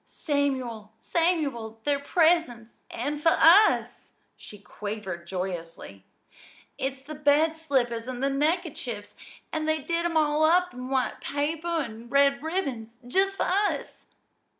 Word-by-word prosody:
"Samuel, 260 -7 -2
Samuel, 280 -8 -1
they're 285 -1 +1
presents 285 -7 +1 0.2
an' 290 +5 -3
for 325 +2 +3
us!" 390 +7 +4 0.2
she 210 - -12
quavered 205 -4 -7
joyously. 170 - -6 0.7
"It's 265 0 -3
the 305 +3 -8
bed 300 +2 +2
slippers 250 -7 -1
and 255 0 -5
the 275 - +2
neckerchiefs, 275 - -2 0.4
an' 310 -1 -1
they 315 0 +1
did 335 +3 -2
'em 335 -1 0
all 305 0 +2
up 360 +3 +3
in 250 +1 -7
white 265 -1 -1
paper 295 +4 -2
an' 240 -9 -3
red 275 +1 +3
ribbons 270 -9 -4
just 390 +8 +1
for - - +1
us." 405 +2 -1
280 Hz, 130 wpm, -26 LUFS, 235-320 Hz, 0.7 s, us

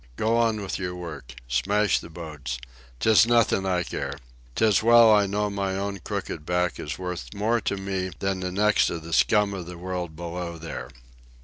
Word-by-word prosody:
Go 110 - +1
on 115 -2 +2
with 100 -1 -4
your 90 -1 -3
work. 75 -8 -8
Smash 100 +12 +2
the - - -11
boats. 75 -6 -6 0.4
'Tis 110 - +5
nothin' 115 -5 +3
I 90 -1 +1
care. - - -4 0.4
'Tis 110 -3 +3
well 115 0 +7
I 105 -1 +4
know 105 +1 0
my 100 -1 -2
own 100 0 -3
crooked 75 - -4
back 90 +2 0
is 75 - -4
worth 90 -1 -5
more 110 +3 +1
to 100 - -1
me 95 -1 -2
than 95 -1 -1
the 90 0 -3
necks 105 +3 +3
of 85 -2 -5
the 85 +1 -7
scum 105 +3 +3
of 90 -3 -6
the 90 -1 -8
world 90 -2 -4
below 85 0 -5
there." 80 -1 -7
95 Hz, 190 wpm, -25 LUFS, 85-105 Hz, 0.4 s, well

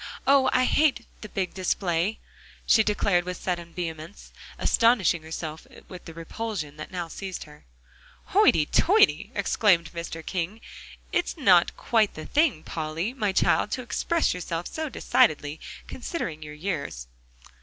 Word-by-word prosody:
Oh! 270 -1 +5
I 255 0 +3
hate 290 -6 +2 0.2
the 215 - -8
big 190 -2 -3
display!" 185 +1 0 0.5
she 220 - +5
declared 205 -4 +1
with 180 +1 -5
sudden 175 -2 -4
vehemence, 165 +1 -7 0.3
astonishing 225 -8 +3
herself 160 0 -7 0.2
with 180 -2 -10
the 165 - -9
repulsion 165 -3 -5
that 155 - -7
now 175 -2 -4
seized 190 +2 -6
her. 150 -1 -16 0.7
"Hoity 155 -2 +5
toity!" 410 - +3
exclaimed 175 -7 +2
Mr. 165 -1 -6
King, 185 +4 -3 0.5
"it's 350 - -1
not 185 - +4
quite 220 -3 +1
the 155 - -7
thing, 295 - +1
Polly, 160 +7 -3
my 215 -7 0
child, 190 - +2
to 255 - -3
express 335 +7 0
yourself 175 -1 -4
so 315 -1 -4
decidedly, 150 - +1 0.3
considering 210 - -5
your 150 0 -8
years." 150 - -4
180 Hz, 140 wpm, -26 LUFS, 165-225 Hz, 0.7 s, Oh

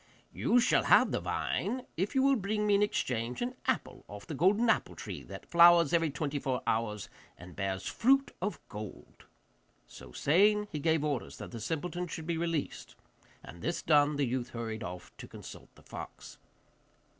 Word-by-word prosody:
'You 245 - +3
shall 240 - +3
have - - +5
the - - 0
vine 255 +1 -2
if 195 - -2
you 265 - +4
will 275 0 +5
bring 210 -1 -1
me 205 - +3
in 200 - +4
exchange 125 - -1
an 245 +1 -2
apple 260 - -1
off 105 0 -10
the - - -6
golden 195 - +3
apple 220 - +1
tree - - -7
that - - -9
flowers 170 -2 +6
every 165 -2 +3
twenty 145 0 -3
four 130 -2 -2
hours, 105 -2 -1 0.3
and 90 -1 -12
bears 95 -2 -3
fruit 270 +3 +2
of 205 +3 -2
gold.' 105 -1 -10 0.6
So - - -13
saying, 210 - +3
he 150 - -3
gave 160 0 +1
orders 145 -5 -3
that - - -8
the 115 - -6
simpleton 175 +7 -3
should 160 -1 -6
be 165 -1 -2
released, 165 -3 -3 0.5
and 85 - -11
this 170 - -2
done, 150 -1 +4
the 140 -1 +1
youth 125 0 -2
hurried 115 -3 -5
off 90 0 -8
to - - -9
consult - - -11
the - - -19
fox. - - -10
160 Hz, 180 wpm, -31 LUFS, -, 0.6 s, flowers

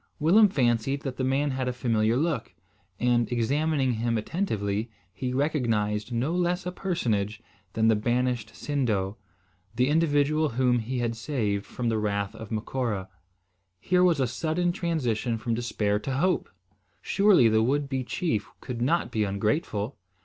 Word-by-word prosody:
Willem 195 +7 +5
fancied 135 -1 +1
that 135 -3 -4
the 130 - -1
man 135 +2 +1
had 130 -1 -2
a 125 - 0
familiar 115 -2 +1
look, 150 -5 -1 0.4
and, 120 -1 +2
examining 135 +3 +1
him 115 +1 0
attentively, 110 - -2 0.2
he 125 -1 -3
recognised 120 -7 0
no 125 +7 0
less 180 0 0
a 180 - -2
personage 115 - -1 0.3
than 110 0 +2
the 110 - +5
banished 120 0 -1
Sindo, 110 -8 -1 0.6
the 125 +3 +2
individual 155 -1 +2
whom 125 0 +2
he 125 +3 -3
had 120 -1 -1
saved 110 -5 -2
from 120 -2 -2
the 110 -1 0
wrath 100 -1 -1
of 110 -1 -9
Macora. 110 -3 -2 0.7
Here 180 - +2
was 175 -5 +4
a 130 - +3
sudden 160 +8 0
transition 125 - -1
from 115 +1 -2
despair 105 -3 0
to 135 +5 -4
hope. 180 +3 +1 0.5
Surely 195 - +5
the 110 0 +3
would 140 +5 +1
be 135 -1 -2
chief 120 - -2
could 125 -3 -6
not 165 +8 +1
be 110 - +1
ungrateful! 105 - -1
125 Hz, 155 wpm, -27 LUFS, 110-150 Hz, 0.7 s, Willem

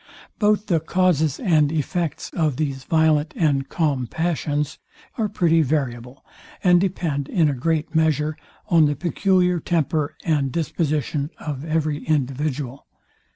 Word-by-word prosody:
Both 210 -1 +2
the 175 -6 +2
causes 160 -3 +1
and 155 - +3
effects 160 0 -2
of 155 -6 0
these 135 -4 -3
violent 160 -1 +2
and 140 -5 +1
calm 140 -7 0
passions 150 -2 -2 0.4
are 220 -3 -1
pretty 165 -4 +3
variable, 130 -4 -2 0.4
and 180 -2 +5
depend, 165 -7 -2
in 165 -4 +3
a 145 - +1
great 160 +4 -1
measure, 155 -1 +1 0.3
on 165 -6 +5
the 145 - 0
peculiar 180 +2 +1
temper 155 -2 -1
and 145 -5 +1
disposition 150 -2 -1
of 145 -3 -5
every 155 -2 -1
individual. 140 -2 -2
155 Hz, 130 wpm, -22 LUFS, 145-170 Hz, 0.4 s, and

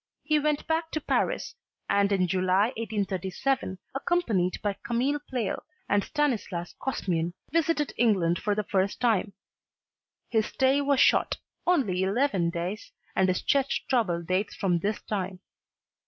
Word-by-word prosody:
He 305 -1 +2
went 300 0 0
back 320 0 0
to 310 - 0
Paris, - - -1 0.3
and 200 0 +2
in 190 -2 +3
July 185 +4 +2
1837, 200 +1 -2 0.2
accompanied 240 - 0
by 205 -1 0
Camille 260 +5 0
Pleyel 245 -6 -2 0.3
and 200 0 +2
Stanislas 220 - -1
Kozmian, 175 -10 -1 0.2
visited 325 -2 +1
England 185 -8 +3
for 205 -1 0
the 210 - 0
first 195 0 0
time. 220 -4 +1 0.9
His 220 -2 +1
stay 265 +2 +2
was 280 -1 +2
short, - - +4 0.3
only 235 - +2
eleven 195 -3 +1
days, 175 +5 -4 0.2
and 190 - +3
his 180 - 0
chest 275 -1 +1
trouble 190 -10 +1
dates 185 +4 -1
from 180 -3 +1
this 205 +4 -1
time. 190 -3 -3
210 Hz, 140 wpm, -27 LUFS, 185-270 Hz, 0.9 s, short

